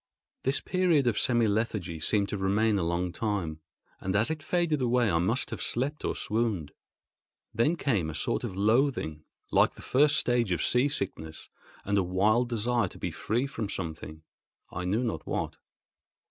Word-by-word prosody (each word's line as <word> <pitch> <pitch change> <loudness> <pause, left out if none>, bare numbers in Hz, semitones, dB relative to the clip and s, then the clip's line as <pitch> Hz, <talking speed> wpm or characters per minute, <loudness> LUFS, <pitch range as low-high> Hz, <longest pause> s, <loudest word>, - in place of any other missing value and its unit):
This 135 +2 0
period 180 -7 +2
of 115 -4 +2
semi 120 -2 +3
lethargy 100 -6 -1
seemed 100 +5 +1
to 105 - -2
remain 100 +2 +2
a - - 0
long 85 +1 -1
time, 95 -8 -2 0.4
and 95 +1 -2
as 110 +7 +2
it 155 -1 -3
faded 160 -2 0
away 120 -3 +2
I 85 - +2
must 110 +9 0
have - - -5
slept 140 +5 -1
or - - -1
swooned. 105 -8 -1 0.8
Then 150 +9 +2
came 110 - 0
a 80 - -6
sort - - -1
of 95 - -4
loathing, 105 - +1 0.3
like - - +4
the - - -12
first 145 +3 +3
stage 120 -5 +1
of 85 -3 0
sea 125 +4 +3
sickness, 80 - -5 0.4
and 100 0 +2
a - - +2
wild 105 +7 +2
desire 120 +1 +1
to - - -12
be - - -3
free 120 +5 -1
from 115 -6 -4
something—I 80 +1 -8
knew 105 +7 +1
not 110 -10 -3
what. - - -2
110 Hz, 175 wpm, -28 LUFS, 90-125 Hz, 0.8 s, like